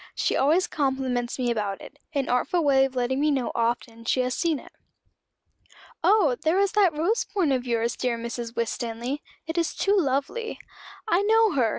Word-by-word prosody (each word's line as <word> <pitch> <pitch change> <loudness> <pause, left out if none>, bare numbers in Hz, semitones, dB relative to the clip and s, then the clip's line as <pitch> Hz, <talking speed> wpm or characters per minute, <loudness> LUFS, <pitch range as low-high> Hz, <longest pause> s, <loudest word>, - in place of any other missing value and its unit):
She - - 0
always 315 +7 +3
compliments 265 -4 -1
me 245 -2 0
about 205 -4 -2
it 290 - -13 0.2
an 275 -2 0
artful 325 +8 +1
way 270 -2 +4
of 265 -1 -6
letting 255 +1 0
me 300 +1 +2
know 265 -4 0
often 230 0 -2
she 255 +2 +1
has 250 0 -1
seen 330 +1 0
it. - - -13 1.3
'Oh 390 - +4
there 320 +4 +2
is 400 0 +2
that 380 -7 +3
rose 390 +10 +1
point 370 -9 0
of 255 -1 -1
yours, 235 0 0
dear 245 -2 -1
Mrs. 235 0 -5
Winstanley; 235 +4 -3 0.2
it 325 +1 -2
is 335 - -1
too 400 +1 +2
lovely.' 305 - -1 0.5
I 380 -3 +3
know 440 +1 +4
her! 255 -8 +2
270 Hz, 185 wpm, -25 LUFS, 240-335 Hz, 1.3 s, way